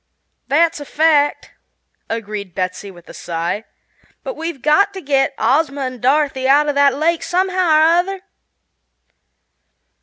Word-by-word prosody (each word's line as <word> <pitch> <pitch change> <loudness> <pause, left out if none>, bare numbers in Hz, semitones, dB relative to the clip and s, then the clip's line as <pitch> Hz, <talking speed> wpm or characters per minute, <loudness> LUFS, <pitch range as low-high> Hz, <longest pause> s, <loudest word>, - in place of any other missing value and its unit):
"That's 330 +3 +2
a 290 - -8
fact," 295 -1 +1 0.6
agreed 210 -5 -5
Betsy 185 +1 -4
with 175 -2 -16
a - - -11
sigh; 170 +6 -4 0.6
"but - - -5
we've 325 -5 -6
got 400 +7 +3
to - - -5
get 275 -2 0
Ozma 275 +4 +1
and 255 -3 -5
Dorothy 270 0 +1
out 290 +2 +4
of 290 - 0
that 280 0 +3
lake, 325 +3 0
somehow 370 0 0
or 310 0 +5
other." 355 +4 +1
285 Hz, 140 wpm, -18 LUFS, 245-325 Hz, 0.6 s, or